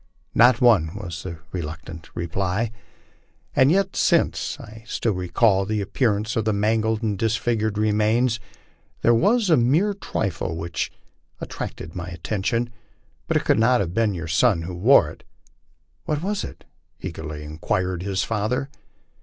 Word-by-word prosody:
* - - -41
Not 120 0 +5
one," 100 -10 +4
was 85 -6 -6
the 85 -2 -6
reluctant 80 -1 -6
reply. 95 +6 -1 0.4
" - - -36
And 130 +3 +5
yet, 195 +1 +1
since - - +1
I 110 +1 -11 0.2
now 115 - +4
recall 95 +2 +2
the 105 +2 -1
appearance 105 +1 0
of 115 - +1
the 110 - +2
mangled 110 +2 +1
and 105 -4 -1
disfigured 110 -1 0
remains, 110 +3 +2 0.6
there 120 - +5
was 205 - +3
a 160 - +6
mere 150 - +3
trifle 100 - -3
which 85 +1 -3 0.5
attracted 80 - -6
my 90 -1 -5
attention, 110 +6 -2 0.6
but - - +2
it - - -2
could - - +3
not 120 +2 +4
have 90 -3 -2
been 110 -2 +1
your 85 -1 -5
son 85 +2 +3
who 90 +2 -5
wore 95 - +5
it." - - -15 0.4
" - - -42
What 150 +1 -1
was 205 +1 -1
it?" - - -9 0.4
eagerly 75 0 -6
inquired 85 +4 -2
the 100 +1 -3
father. 115 +6 -1
105 Hz, 155 wpm, -23 LUFS, 90-120 Hz, 0.6 s, a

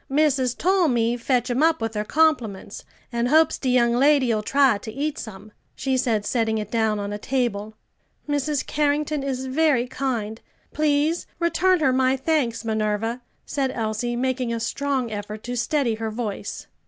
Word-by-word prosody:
"Missus 270 -4 +2
tole 370 -1 +2
me 235 -3 +1
fetch 245 0 0
'em 250 +4 0
up 325 0 +3
with 225 -1 -3
her 210 -1 -1
compliments, 240 -9 0 0.3
an' 235 0 0
hopes 315 +3 +4
de 260 - -1
young 240 -1 +3
lady'll 255 -4 +3
try 270 -2 +3
to 220 - -8
eat 285 +5 -3
some," 210 0 -9 0.2
she 265 0 -1
said, 225 -5 0
setting 225 -1 0
it 210 -1 -5
down 220 -2 +1
on 205 0 -4
a 205 - -5
table. 220 -4 -2 0.5
"Mrs. 290 0 -1
Carrington 295 0 0
is 265 -1 -3
very 265 -2 +2
kind. 235 -4 -3 0.3
Please 305 +2 +1
return 345 +1 +2
her 265 -3 +3
my 260 +1 +2
thanks, 265 -5 0
Minerva," 220 +2 -1 0.2
said 275 -2 -1
Elsie, 230 0 -2
making 255 -1 -1
a 230 - -2
strong 260 +1 -2
effort 210 0 -6
to 245 +1 -4
steady 245 0 0
her 220 0 -3
voice. 215 -2 -5
250 Hz, 165 wpm, -23 LUFS, 225-285 Hz, 0.5 s, hopes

